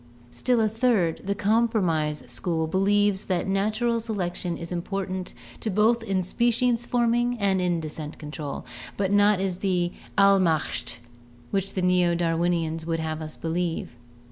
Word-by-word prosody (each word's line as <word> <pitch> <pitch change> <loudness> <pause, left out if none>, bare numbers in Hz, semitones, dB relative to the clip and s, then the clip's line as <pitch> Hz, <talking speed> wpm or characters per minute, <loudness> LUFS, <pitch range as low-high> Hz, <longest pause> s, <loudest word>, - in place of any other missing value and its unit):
Still 250 - +1
a 220 - +3
third, 220 -7 +1
the 200 +1 0
Compromise 200 -8 +1
School, 160 +7 -1
believes 200 +3 +2
that 185 -2 0
natural 215 +5 +1
selec 210 -6 -2
tion 175 -2 -4
is 170 0 -7
important 185 +1 -3 0.4
both 225 +3 +4
in 195 -4 -1
species 240 +4 +1
forming 240 0 +1
and 185 -4 +1
descent 155 0 -6
control, 150 -2 -6 0.3
but 195 -1 0
is - - +2
not 205 -1 +5 0.2
the 180 -3 0 0.3
"Allmacht" 190 -6 +3 0.5
which 195 0 -2
the 185 - -1
Neo 180 -1 +3
Darwinians 165 -1 0
would 165 0 -2
have 160 0 -3
us 155 -1 -7
believe. 165 -4 -2
190 Hz, 140 wpm, -26 LUFS, 170-210 Hz, 0.5 s, not